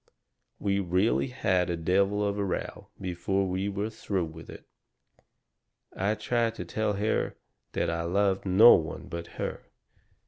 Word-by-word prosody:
We 100 -1 0
really 95 +7 +1
had 95 -8 0
a 85 - -1
devil 100 +5 +1
of 100 0 -2
a - - +1
row 95 - -4
before 95 +2 -1
we 95 +2 -1
were 100 +2 -3
through 100 -5 -2
with 80 0 -11
it. - - -11 1.3
I 100 +3 0
tried 115 +1 0
to - - -6
tell 110 -1 -1
her 105 +2 0 0.4
that - - 0
I 85 0 -2
loved 95 +3 +1
no 100 +5 +8
one 80 -2 -1
but 85 0 -5
her. - - -3
100 Hz, 150 wpm, -28 LUFS, 90-105 Hz, 1.3 s, no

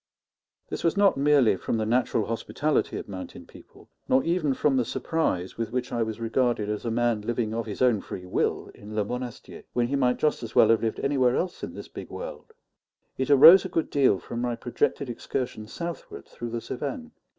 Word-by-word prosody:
This - - -5
was 165 +4 +1
not 200 -1 +5
merely 140 -6 +4
from 105 - -2
the 110 - -1
natural 115 -2 +1
hospitality 140 +6 -1
of - - -7
mountain 95 -2 -8
people, - - -17 0.2
nor 130 +1 +4
even 165 -5 0
from 140 0 +2
the 130 - +3
surprise 115 - -2
with 115 -1 -2
which 125 0 -2
I 120 - -1
was 110 0 -2
regarded 115 -2 0
as 105 +2 -3
a - - 0
man 120 -1 +1
living 110 0 -2
of 115 0 -3
his 105 +4 -2
own 120 -5 +3
free 90 - -8
will 90 - -1
in 105 +1 -10
Le 105 -1 +1
Monastier, 125 +1 -7
when 120 - +1
he 140 - 0
might 125 -2 +2
just 150 - 0
as 115 - -8
well - - +6
have 115 -2 +4
lived 110 -1 -2
anywhere 130 -3 +2
else 180 0 -2
in - - -6
this - - -8
big - - -9
world; - - -8 0.7
it 130 - -1
arose 155 +7 +9
a - - -5
good 165 - -1
deal 135 -8 +3
from 120 +5 -6
my 120 -1 -1
projected 125 +3 -1
excursion 120 -2 -4
southward 170 +7 -7
through 120 - -7
the 115 0 -4
Cevennes. 145 - -5
120 Hz, 205 wpm, -26 LUFS, 110-140 Hz, 0.7 s, arose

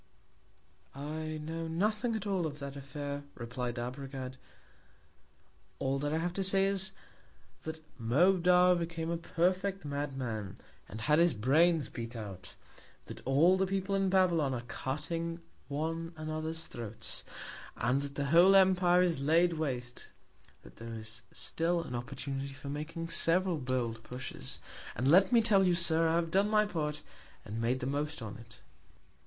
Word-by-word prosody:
I 155 +2 -4
know 165 +1 -4
nothing 215 +8 0
at 215 -2 -4
all 190 -5 0
of 145 -1 -7
that 140 -1 -6
Affair, 140 +1 -5
replied 120 +1 -4
Arbogad, 130 +1 -5 1.4
all 135 +1 0
that 145 +1 -1
I 160 - +1
have 175 +2 -1
to 195 - -1
say, 195 +1 +3
is, 195 -1 0 0.7
that 160 0 -6 0.2
Moabdar 180 +8 +5
became 165 -1 -3
a 170 - 0
perfect 185 +2 0
Madman, 135 -8 -3 0.3
and 110 - -7
had 150 +6 +3
his 170 -5 +4
Brains 155 +7 +3
beat 115 +1 -7
out; 100 -4 -8 0.5
that - - -9
all 160 +8 +5
the 190 - +2
People 195 +1 -1
in 195 -1 +2
Babylon 170 -8 +3
are 120 - -3
cutting 165 +7 -4 0.3
one 165 +3 -3
another's 155 +1 -3
Throats, 115 -2 -4 0.5
and 125 +4 +1
that 140 0 -6
the 140 - -1
whole 170 +7 +6
Empire 180 -2 +5
is 170 -6 +1
laid 165 +4 +4
waste; 125 -6 -3 0.5
that - - -15
there 115 0 -7
is 110 0 -6
still 170 +1 0
an 140 - -7
Opportunity 135 +2 -4
for 135 +1 -8
making 160 +3 -5
several 175 0 +2
bold 125 -3 -2
Pushes; 125 - -7 0.4
and 130 +3 +2
let 185 +6 +6
me 235 -2 +5
tell 195 -4 +4
you, 175 - +3
Sir, 165 -1 +4
I 165 - +2
have 165 -1 0
done 195 +3 +3
my 215 0 +4
Part, 150 -6 -3 0.4
and 110 +3 -4
made 125 +3 0
the - - -2
most 145 +3 -2
on't. 110 +1 -10
155 Hz, 155 wpm, -32 LUFS, 130-175 Hz, 1.4 s, whole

